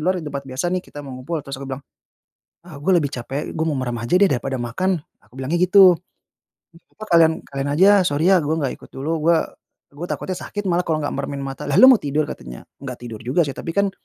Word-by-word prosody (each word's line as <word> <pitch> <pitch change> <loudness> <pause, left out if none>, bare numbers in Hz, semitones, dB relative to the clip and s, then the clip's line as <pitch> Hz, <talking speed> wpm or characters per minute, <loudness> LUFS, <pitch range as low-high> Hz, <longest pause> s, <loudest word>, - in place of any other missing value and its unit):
luar, 185 +4 +1
di 165 - -5
tempat 140 -2 -6
biasa 135 +8 -2
nih, 185 - 0
kita 145 -5 -11
mau 135 - -8
ngumpul." 155 +2 -4
Terus 135 -1 -7
aku 135 - -7
bilang, 135 +1 -6 0.8
"Ah, 155 -5 -11
gua 185 +5 +2
lebih 145 -5 +1
capek. 135 +4 -5
Gua 160 0 -2
mau 150 - 0
merem 120 -3 -3
aja 120 +9 0
deh 195 -2 +4
daripada 130 +1 -1
makan." 155 +8 -1 0.2
Aku 120 - -22
bilangnya 140 +6 -2
gitu. 185 -2 +6 0.7
Eh, 165 - -19 0.2
apa, 215 - -15
"Kalian 165 -1 +6
kalian 140 0 -5
aja, 190 +6 +6 0.2
sorry 155 +6 +2
ya, 190 - +6
gua 155 0 -1
nggak 135 - -2
ikut - - -16
dulu. 140 +4 -4 0.2
Gua 170 -1 +5 0.5
gua 155 +5 -7
takutnya 185 0 -4
sakit 205 -3 -4
malah 175 +1 0
kalau 155 -2 0
nggak 145 - -2
meremin 140 0 -4
mata." 135 +1 -6
"Lah, 145 - -1
lu 260 +1 +9
mau 245 - +6
tidur?" 145 +1 -1
Katanya. - - -9 0.2
"Nggak 130 -3 -7
tidur 115 -3 -7
juga 130 +9 +1
sih, 145 - -2
tapi 165 - -5
kan" 200 -1 +2
150 Hz, 240 wpm, -21 LUFS, 135-175 Hz, 0.8 s, lu